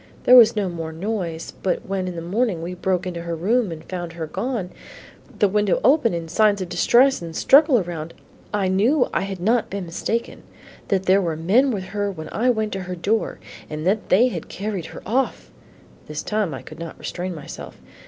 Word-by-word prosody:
There 250 Hz, -, +7 dB
was 235 Hz, -3 st, +8 dB
no 205 Hz, -3 st, 0 dB
more 165 Hz, -2 st, -5 dB
noise, 170 Hz, -2 st, -4 dB
but 190 Hz, -, -1 dB
when 190 Hz, -1 st, -2 dB
in 180 Hz, -, -5 dB
the 165 Hz, -, -5 dB
morning 190 Hz, -1 st, 0 dB
we 175 Hz, +2 st, -4 dB
broke 180 Hz, 0 st, -1 dB
into 175 Hz, -2 st, -4 dB
her 170 Hz, 0 st, -3 dB
room 210 Hz, +5 st, +1 dB
and 160 Hz, -1 st, -7 dB
found 175 Hz, -2 st, -5 dB
her 165 Hz, -1 st, -4 dB
gone, 210 Hz, -, -3 dB, 0.7 s
the 205 Hz, -, +4 dB
window 205 Hz, 0 st, +1 dB
open 275 Hz, -4 st, +4 dB
and 165 Hz, -1 st, -4 dB
signs 210 Hz, +3 st, +3 dB
of 185 Hz, -2 st, -4 dB
distress 245 Hz, +9 st, +4 dB
and 165 Hz, -1 st, -7 dB
struggle 290 Hz, -1 st, +6 dB
around, 170 Hz, -5 st, -4 dB, 0.4 s
I 205 Hz, -2 st, 0 dB
knew 230 Hz, +9 st, +3 dB
I -, -, +1 dB
had 195 Hz, -1 st, -4 dB
not 225 Hz, +6 st, +1 dB
been 195 Hz, -2 st, -4 dB
mistaken; 225 Hz, +7 st, -3 dB, 0.5 s
that 190 Hz, -1 st, +1 dB
there 190 Hz, +2 st, +4 dB
were 165 Hz, -4 st, -1 dB
men 200 Hz, -, +3 dB
with 205 Hz, -6 st, -2 dB
her 205 Hz, +1 st, -2 dB
when 160 Hz, -4 st, -8 dB
I 245 Hz, +3 st, +1 dB
went 220 Hz, -3 st, 0 dB
to 195 Hz, -, -3 dB
her 180 Hz, -, -3 dB
door, 210 Hz, +6 st, -1 dB, 0.3 s
and 155 Hz, +1 st, -5 dB
that 205 Hz, +3 st, 0 dB
they 235 Hz, +7 st, +5 dB
had -, -, -6 dB
carried 195 Hz, -4 st, -4 dB
her -, -, -10 dB
off 255 Hz, +6 st, -1 dB, 0.3 s
" -, -, -26 dB
This 150 Hz, 0 st, -5 dB
time 210 Hz, -5 st, -1 dB
I 135 Hz, -, -7 dB
could -, -, -11 dB
not 165 Hz, -1 st, -7 dB
restrain 180 Hz, 0 st, -5 dB
myself. 150 Hz, -, -9 dB
190 Hz, 210 wpm, -22 LUFS, 170-220 Hz, 0.7 s, was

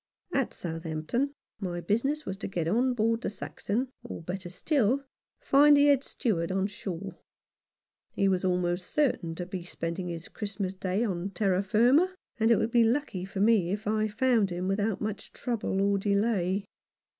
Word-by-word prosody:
At 270 Hz, -3 st, +1 dB
Southampton 165 Hz, -, -3 dB, 0.2 s
my 180 Hz, -4 st, -3 dB
business 235 Hz, -, 0 dB
was 190 Hz, -, -3 dB
to 215 Hz, -, -4 dB
get 170 Hz, -4 st, -2 dB
on 245 Hz, +7 st, +2 dB
board 230 Hz, 0 st, +1 dB
the -, -, -1 dB
Saxon, 220 Hz, +4 st, -3 dB
or, 235 Hz, -8 st, -7 dB
better 180 Hz, +1 st, -5 dB
still, 255 Hz, -, +2 dB
to 280 Hz, -, -14 dB, 0.4 s
find 290 Hz, +1 st, +6 dB
the 285 Hz, -, +6 dB
Head 280 Hz, -2 st, +4 dB
Steward 185 Hz, -12 st, -1 dB
on 190 Hz, 0 st, +1 dB
shore. 195 Hz, -2 st, -6 dB, 0.9 s
He 195 Hz, -, +2 dB
was 185 Hz, -1 st, +1 dB
almost 180 Hz, -1 st, 0 dB
certain 240 Hz, -, +1 dB
to 180 Hz, -, -4 dB
be 180 Hz, -1 st, -5 dB
spending 170 Hz, +1 st, -4 dB
his 170 Hz, -1 st, -5 dB
Christmas 200 Hz, -2 st, -4 dB
Day 190 Hz, +3 st, -1 dB
on 190 Hz, -4 st, -2 dB
terra 195 Hz, -1 st, +1 dB
firma, 245 Hz, -, +4 dB, 0.2 s
and 225 Hz, +1 st, +3 dB
it 230 Hz, -, +7 dB
would 225 Hz, -, 0 dB
be 235 Hz, -1 st, +5 dB
lucky 225 Hz, -6 st, 0 dB
for 195 Hz, 0 st, -4 dB
me 210 Hz, -5 st, +4 dB
if 205 Hz, +3 st, -3 dB
I 215 Hz, +1 st, +1 dB
found 225 Hz, -1 st, +2 dB
him 180 Hz, +1 st, -3 dB
without 205 Hz, +1 st, 0 dB
much 215 Hz, -1 st, -4 dB
trouble 230 Hz, -5 st, -2 dB
or 200 Hz, 0 st, +2 dB
delay. 200 Hz, -1 st, +1 dB
200 Hz, 175 wpm, -29 LUFS, 180-235 Hz, 0.9 s, it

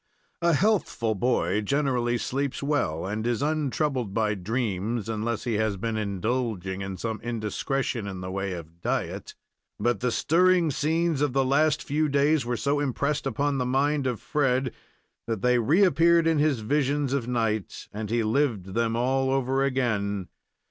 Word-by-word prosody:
A 170 Hz, 0 st, +3 dB
healthful 165 Hz, -, +1 dB
boy 110 Hz, 0 st, +1 dB
generally 125 Hz, -1 st, 0 dB
sleeps 140 Hz, +3 st, -2 dB
well, 140 Hz, -, 0 dB
and 105 Hz, +4 st, -2 dB
is 120 Hz, +2 st, 0 dB
untroubled 145 Hz, -7 st, -1 dB
by 110 Hz, -2 st, +2 dB
dreams, 110 Hz, +1 st, -2 dB
unless 110 Hz, 0 st, -2 dB
he 120 Hz, -, -1 dB
has 110 Hz, -2 st, 0 dB
been 115 Hz, +3 st, -2 dB
indulging 105 Hz, -2 st, -2 dB
in 95 Hz, -1 st, -5 dB
some 110 Hz, +3 st, -4 dB
indiscretion 120 Hz, +1 st, -2 dB
in 95 Hz, -2 st, -5 dB
the 90 Hz, 0 st, -5 dB
way 95 Hz, 0 st, -2 dB
of 85 Hz, 0 st, -10 dB
diet, -, -, -3 dB, 0.4 s
but 120 Hz, 0 st, +1 dB
the 125 Hz, 0 st, 0 dB
stirring 170 Hz, +6 st, +3 dB
scenes 160 Hz, +1 st, 0 dB
of 145 Hz, -4 st, +1 dB
the 135 Hz, 0 st, +2 dB
last 150 Hz, +3 st, +2 dB
few 150 Hz, +1 st, 0 dB
days 145 Hz, +1 st, +3 dB
were 120 Hz, -1 st, -1 dB
so 140 Hz, +3 st, 0 dB
impressed 140 Hz, +1 st, -1 dB
upon 140 Hz, +2 st, 0 dB
the -, -, +1 dB
mind 140 Hz, +2 st, +1 dB
of 125 Hz, -3 st, -2 dB
Fred 130 Hz, -4 st, 0 dB, 0.5 s
that 110 Hz, -4 st, -3 dB
they 125 Hz, 0 st, +4 dB
reappeared 170 Hz, -, +4 dB
in 165 Hz, -2 st, +3 dB
his 145 Hz, -6 st, +2 dB
visions 140 Hz, +3 st, 0 dB
of 130 Hz, -4 st, -1 dB
night, 115 Hz, -5 st, -2 dB
as 105 Hz, 0 st, -4 dB
he 115 Hz, 0 st, +1 dB
lived 110 Hz, -5 st, 0 dB
them 115 Hz, 0 st, 0 dB
all 130 Hz, +2 st, +1 dB
over 135 Hz, 0 st, +1 dB
again. 105 Hz, -8 st, -1 dB
125 Hz, 160 wpm, -26 LUFS, 110-145 Hz, 0.5 s, they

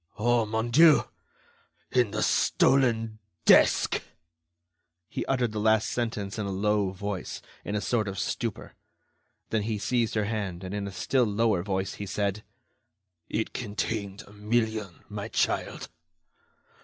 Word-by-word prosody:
"Oh, 120 Hz, 0 st, +2 dB
mon 110 Hz, +2 st, -1 dB
Dieu!... 155 Hz, +4 st, +7 dB, 0.9 s
In 125 Hz, -4 st, +3 dB
the 105 Hz, +1 st, -1 dB
stolen 115 Hz, -5 st, +2 dB, 0.3 s
desk!" -, -, +5 dB, 1.1 s
He -, -, -4 dB
uttered 125 Hz, -4 st, +1 dB
the 105 Hz, -, -3 dB
last 110 Hz, 0 st, +3 dB
sentence 110 Hz, -4 st, -3 dB
in 105 Hz, -, -2 dB
a -, -, -3 dB
low 105 Hz, 0 st, +1 dB
voice, 95 Hz, -1 st, -5 dB, 0.2 s
in 105 Hz, -, -3 dB
a 105 Hz, -, 0 dB
sort 110 Hz, -2 st, 0 dB
of 100 Hz, 0 st, -4 dB
stupor. -, -, -3 dB, 0.8 s
Then 110 Hz, -, +1 dB
he 110 Hz, +1 st, -2 dB
seized 115 Hz, +2 st, 0 dB
her 105 Hz, -1 st, +1 dB
hand, 100 Hz, -5 st, -3 dB
and 95 Hz, +1 st, -5 dB
in 100 Hz, -1 st, -3 dB
a -, -, -6 dB
still 120 Hz, +7 st, +1 dB
lower 105 Hz, -3 st, +1 dB
voice, 95 Hz, 0 st, -2 dB
he 100 Hz, -, -4 dB
said: 100 Hz, +2 st, -2 dB, 0.9 s
"It 110 Hz, -, -2 dB
contained 105 Hz, -2 st, -3 dB
a 100 Hz, -, -16 dB
million, 110 Hz, -2 st, -1 dB
my -, -, -5 dB
child." -, -, -1 dB
105 Hz, 145 wpm, -27 LUFS, 100-115 Hz, 1.1 s, Dieu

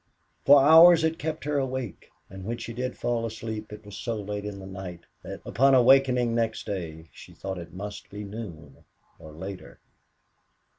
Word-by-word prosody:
For 140 Hz, 0 st, +9 dB
hours 165 Hz, +4 st, +8 dB
it 160 Hz, 0 st, 0 dB
kept 155 Hz, 0 st, -4 dB
her 145 Hz, -1 st, 0 dB
awake; 130 Hz, -6 st, -4 dB, 0.2 s
and 95 Hz, 0 st, -10 dB
when 115 Hz, +4 st, -3 dB
she 115 Hz, -, -7 dB
did 125 Hz, +2 st, -4 dB
fall 120 Hz, -1 st, -1 dB
asleep 110 Hz, -1 st, -5 dB
it 105 Hz, 0 st, -10 dB
was 105 Hz, -1 st, -10 dB
so 115 Hz, -2 st, -3 dB
late 105 Hz, -1 st, -5 dB
in 105 Hz, -1 st, -5 dB
the 95 Hz, -, -9 dB
night 95 Hz, -2 st, -8 dB, 0.2 s
that, -, -, -8 dB
upon 135 Hz, +2 st, +4 dB
awakening 125 Hz, -1 st, +4 dB
next 115 Hz, -1 st, -1 dB
day, 80 Hz, -4 st, -6 dB
she -, -, -13 dB
thought 95 Hz, -1 st, -6 dB
it 85 Hz, -1 st, -10 dB
must 105 Hz, +2 st, -7 dB
be 105 Hz, +1 st, -7 dB
noon 95 Hz, -9 st, -9 dB, 0.4 s
or 80 Hz, -, -11 dB
later. 95 Hz, +4 st, -9 dB
110 Hz, 180 wpm, -26 LUFS, 95-130 Hz, 0.4 s, For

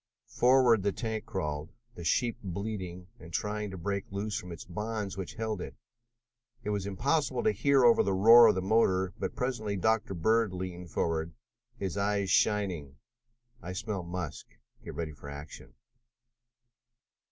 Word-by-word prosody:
Forward 125 Hz, -3 st, +4 dB
the 100 Hz, +1 st, +1 dB
tank 110 Hz, 0 st, -4 dB
crawled, 75 Hz, -4 st, -3 dB, 0.2 s
the 85 Hz, -, -9 dB
sheep 115 Hz, -, +1 dB
bleating 95 Hz, -2 st, -5 dB
and 80 Hz, -, -12 dB
trying 105 Hz, +4 st, -2 dB
to 95 Hz, -, -7 dB
break 100 Hz, +3 st, -2 dB
loose 100 Hz, +1 st, -3 dB
from 105 Hz, -5 st, -5 dB
the 85 Hz, -, -7 dB
bonds 105 Hz, +2 st, -4 dB
which 95 Hz, -2 st, -6 dB
held 110 Hz, -4 st, -3 dB
it. -, -, -7 dB, 0.9 s
It 105 Hz, -, -2 dB
was 100 Hz, -1 st, -2 dB
impossible 130 Hz, -, 0 dB
to -, -, +4 dB
hear 135 Hz, +6 st, +3 dB
much -, -, +5 dB
over 120 Hz, -1 st, +6 dB
the 100 Hz, -, +1 dB
roar 115 Hz, +4 st, +9 dB
of 110 Hz, -, +4 dB
the 95 Hz, -, -1 dB
motor, 95 Hz, -3 st, +2 dB
but -, -, -3 dB
presently 115 Hz, -5 st, -2 dB
Dr. 110 Hz, +1 st, +1 dB
Bird 110 Hz, +3 st, +2 dB
leaned 90 Hz, -1 st, -6 dB
forward, 80 Hz, +1 st, -1 dB, 0.4 s
his 100 Hz, -2 st, -3 dB
eyes 100 Hz, -1 st, 0 dB
shining. 90 Hz, -10 st, +1 dB, 0.7 s
"I 90 Hz, -, -6 dB
smell 105 Hz, 0 st, -3 dB
musk," 85 Hz, -3 st, -5 dB
he -, -, -28 dB
announced. -, -, -31 dB
"Get -, -, -7 dB
ready 80 Hz, -2 st, -3 dB
for 70 Hz, -1 st, -11 dB
action." 70 Hz, -4 st, -10 dB
100 Hz, 165 wpm, -30 LUFS, 90-110 Hz, 0.9 s, roar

